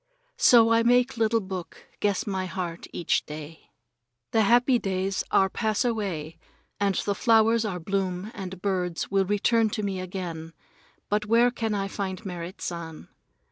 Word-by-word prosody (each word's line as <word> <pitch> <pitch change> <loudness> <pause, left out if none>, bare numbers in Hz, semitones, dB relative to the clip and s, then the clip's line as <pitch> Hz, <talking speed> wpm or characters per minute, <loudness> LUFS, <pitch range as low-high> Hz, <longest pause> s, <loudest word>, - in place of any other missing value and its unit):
So 230 -2 +6
I 230 0 +5
make 245 +2 +3
little 225 0 +2
book 185 -3 -7
guess 205 -2 0
my 190 -2 -2
heart 180 -2 -5
each 170 - 0
day. 155 +1 -9 0.6
The 225 - +3
happy 240 +4 +4
days 190 -1 -1
are 190 - +4
pass 220 +4 -1
away, 190 -9 -3 0.4
and 200 -1 +1
the 200 - 0
flowers 225 +1 +3
are 185 -4 -3
bloom 190 +2 -2
and 190 -2 -7
birds 180 -4 -1
will 195 -1 +3
return 215 +3 +2
to 210 0 -3
me 195 -2 -2
again, 175 -3 -6 0.5
but 210 +1 0
where 235 +2 +4
can 225 -3 -2
I 195 -1 -1
find 195 +1 -5
Merrit 175 0 -6
San? 165 -2 -6
195 Hz, 155 wpm, -26 LUFS, 180-225 Hz, 0.6 s, So